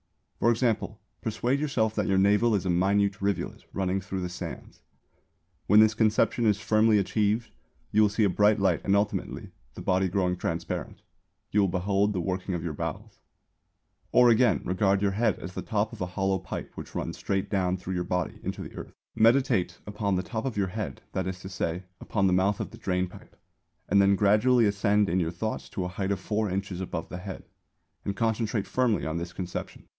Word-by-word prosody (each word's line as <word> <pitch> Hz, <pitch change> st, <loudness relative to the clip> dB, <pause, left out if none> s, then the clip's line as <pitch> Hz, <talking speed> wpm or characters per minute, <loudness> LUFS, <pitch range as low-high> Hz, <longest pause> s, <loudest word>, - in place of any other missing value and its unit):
For 115 Hz, -, +3 dB
example 115 Hz, -2 st, 0 dB, 0.2 s
persuade 120 Hz, +5 st, 0 dB
yourself 125 Hz, -7 st, 0 dB
that 105 Hz, -3 st, -1 dB
your 95 Hz, -, +2 dB
navel 105 Hz, +4 st, +4 dB
is 95 Hz, -, -1 dB
a -, -, 0 dB
minute 100 Hz, +3 st, +2 dB
rivulet 100 Hz, 0 st, -2 dB
running 95 Hz, 0 st, 0 dB
through 95 Hz, +1 st, -4 dB
the 90 Hz, -, -3 dB
sands. 90 Hz, -, -8 dB, 0.9 s
When 105 Hz, +2 st, +7 dB
this 110 Hz, 0 st, +6 dB
conception 110 Hz, +1 st, +2 dB
is 105 Hz, -1 st, +3 dB
firmly 110 Hz, +1 st, +3 dB
achieved, 105 Hz, +3 st, 0 dB, 0.4 s
you 105 Hz, -, +4 dB
will 105 Hz, -, +5 dB
see 105 Hz, +2 st, +1 dB
a 100 Hz, -, +4 dB
bright 105 Hz, +3 st, +3 dB
light 95 Hz, -4 st, +2 dB
and 100 Hz, -, +2 dB
ultimately, 100 Hz, +1 st, -2 dB, 0.2 s
the -, -, -7 dB
body 95 Hz, 0 st, +2 dB
growing 90 Hz, -1 st, +1 dB
transparent, 85 Hz, -1 st, -4 dB, 0.5 s
you 105 Hz, -, +3 dB
will 100 Hz, -, +3 dB
behold 100 Hz, +3 st, +1 dB
the 95 Hz, -, -1 dB
working 95 Hz, +1 st, -2 dB
of 85 Hz, -, -4 dB
your 85 Hz, -3 st, -3 dB
bowels. -, -, -6 dB, 0.9 s
Or 125 Hz, -1 st, +6 dB
again, 120 Hz, +2 st, +4 dB
regard 95 Hz, +2 st, +2 dB
your 100 Hz, -, +2 dB
head 110 Hz, 0 st, +1 dB
as 90 Hz, -, -8 dB
the -, -, -4 dB
top 105 Hz, 0 st, -1 dB
of -, -, -9 dB
a 90 Hz, -, -1 dB
hollow 95 Hz, +1 st, 0 dB
pipe 95 Hz, -, -6 dB
which -, -, -9 dB
runs -, -, -4 dB
straight 95 Hz, -1 st, -1 dB
down 95 Hz, -2 st, +1 dB
through 95 Hz, +1 st, -5 dB
your 90 Hz, -1 st, -1 dB
body 90 Hz, -1 st, -2 dB
into -, -, -4 dB
the -, -, -10 dB
earth. -, -, -8 dB, 0.2 s
Meditate 110 Hz, -7 st, +3 dB
upon 105 Hz, -1 st, -1 dB
the 90 Hz, -, -1 dB
top 110 Hz, +4 st, -4 dB
of 130 Hz, -5 st, -3 dB
your 95 Hz, -2 st, +1 dB
head, 105 Hz, +2 st, -5 dB
that 95 Hz, -1 st, -2 dB
is 95 Hz, -1 st, -4 dB
to 95 Hz, -, -7 dB
say, 90 Hz, -1 st, -3 dB, 0.2 s
upon 100 Hz, -3 st, 0 dB
the 95 Hz, -, +3 dB
mouth 95 Hz, +2 st, +2 dB
of -, -, -4 dB
the -, -, -12 dB
drain 90 Hz, 0 st, 0 dB
pipe, 90 Hz, -, -15 dB, 0.5 s
and 100 Hz, +1 st, +4 dB
then 100 Hz, 0 st, +5 dB
gradually 110 Hz, +5 st, +4 dB
ascend 100 Hz, 0 st, +2 dB
in 90 Hz, +1 st, +1 dB
your 85 Hz, -2 st, 0 dB
thoughts 90 Hz, +6 st, -4 dB
to 100 Hz, -3 st, -3 dB
a -, -, -3 dB
height 95 Hz, +1 st, -2 dB
of 100 Hz, -, -1 dB
four 105 Hz, +2 st, -1 dB
inches 95 Hz, -1 st, -3 dB
above 85 Hz, -3 st, -4 dB
the 90 Hz, -, -6 dB
head, 95 Hz, +1 st, -7 dB, 0.6 s
and 100 Hz, -, -3 dB
concentrate 110 Hz, -1 st, 0 dB
firmly 120 Hz, -7 st, +1 dB
on 80 Hz, +1 st, -2 dB
this 85 Hz, +1 st, -4 dB
conception. 90 Hz, -1 st, -6 dB
100 Hz, 205 wpm, -27 LUFS, 90-110 Hz, 0.9 s, When